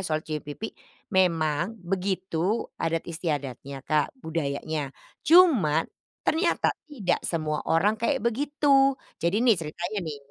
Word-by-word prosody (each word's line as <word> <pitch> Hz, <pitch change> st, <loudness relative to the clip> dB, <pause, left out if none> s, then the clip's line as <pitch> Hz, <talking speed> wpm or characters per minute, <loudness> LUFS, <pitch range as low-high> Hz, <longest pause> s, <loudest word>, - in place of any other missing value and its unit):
soal 155 Hz, -4 st, -2 dB
cium 155 Hz, -1 st, -3 dB
pipi. 150 Hz, +10 st, -7 dB, 0.4 s
Memang, 170 Hz, +1 st, +1 dB
begitu 185 Hz, +1 st, -1 dB, 0.2 s
adat 165 Hz, 0 st, 0 dB
istiadatnya 140 Hz, -5 st, -4 dB
Kak, 155 Hz, -, 0 dB
budayanya. 155 Hz, -2 st, -2 dB, 0.3 s
Cuman, 260 Hz, -, +5 dB, 0.4 s
ternyata 340 Hz, +2 st, +2 dB, 0.2 s
tidak 210 Hz, -12 st, -1 dB
semua 155 Hz, -2 st, -2 dB
orang 195 Hz, +7 st, +3 dB
kayak 250 Hz, 0 st, 0 dB
begitu. 275 Hz, +2 st, +3 dB, 0.2 s
Jadi 200 Hz, +8 st, +1 dB
nih, 235 Hz, -, +6 dB
ceritanya 175 Hz, +6 st, -4 dB
nih, 160 Hz, -4 st, -5 dB
175 Hz, 115 wpm, -26 LUFS, 155-225 Hz, 0.4 s, nih